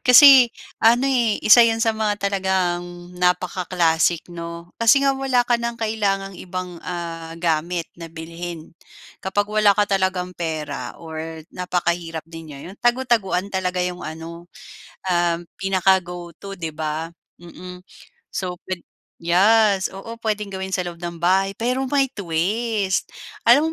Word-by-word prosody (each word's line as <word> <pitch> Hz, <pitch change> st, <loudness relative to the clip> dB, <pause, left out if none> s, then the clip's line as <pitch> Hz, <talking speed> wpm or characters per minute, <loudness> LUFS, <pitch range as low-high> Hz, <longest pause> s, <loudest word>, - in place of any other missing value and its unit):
Kasi 260 Hz, -1 st, +9 dB, 0.3 s
ano 235 Hz, +3 st, +5 dB
eh, 245 Hz, -5 st, +2 dB
isa 225 Hz, +3 st, +9 dB
yun 230 Hz, -1 st, +5 dB
sa 225 Hz, 0 st, +2 dB
mga 215 Hz, -1 st, 0 dB
talagang 180 Hz, -3 st, -1 dB
napaka-classic 180 Hz, -2 st, +1 dB
'no, 170 Hz, 0 st, -8 dB
kasi 275 Hz, +5 st, +5 dB
nga 275 Hz, -, +4 dB
wala 265 Hz, -2 st, +1 dB
ka 240 Hz, -1 st, +1 dB
ng 235 Hz, 0 st, -3 dB
kailangang 200 Hz, -4 st, -1 dB
ibang 180 Hz, -2 st, -6 dB
ah, 165 Hz, -2 st, -6 dB
gamit 170 Hz, +1 st, 0 dB, 0.2 s
na 165 Hz, -, -7 dB
bilhin. 165 Hz, 0 st, -8 dB, 0.5 s
Kapag 195 Hz, +2 st, 0 dB
wala 210 Hz, -1 st, +3 dB
ka 210 Hz, -, +4 dB
talagang 185 Hz, -2 st, 0 dB
pera 160 Hz, -3 st, -4 dB
or 160 Hz, -1 st, -7 dB
napakahirap 175 Hz, -2 st, -2 dB
din 165 Hz, 0 st, -10 dB
niyo, 145 Hz, +5 st, -9 dB
yun -, -, -15 dB
tago-taguan 230 Hz, -6 st, +1 dB
talaga 185 Hz, -1 st, -1 dB
yung 180 Hz, 0 st, -4 dB
ano 165 Hz, +2 st, -8 dB, 0.6 s
um 175 Hz, -2 st, +2 dB, 0.2 s
pinaka-go 185 Hz, -3 st, 0 dB
to 195 Hz, -1 st, -9 dB
'di 160 Hz, -3 st, -5 dB
ba? 160 Hz, +2 st, -4 dB, 0.2 s
Mm. 180 Hz, +1 st, -10 dB, 0.6 s
So 180 Hz, -2 st, -3 dB
pwed 185 Hz, -2 st, -4 dB, 0.3 s
yes, 195 Hz, +3 st, +3 dB
oo 230 Hz, +4 st, -8 dB
puwedeng 210 Hz, -3 st, -2 dB
gawin 190 Hz, 0 st, -5 dB
sa 180 Hz, -, -2 dB
loob 170 Hz, -1 st, -7 dB
ng 170 Hz, -1 st, -5 dB
bahay 190 Hz, +3 st, +2 dB
pero 250 Hz, +3 st, -1 dB
may 280 Hz, 0 st, +3 dB
twist. 200 Hz, +3 st, -1 dB, 0.4 s
Alam 295 Hz, +7 st, +6 dB
185 Hz, 140 wpm, -22 LUFS, 170-215 Hz, 0.6 s, Kasi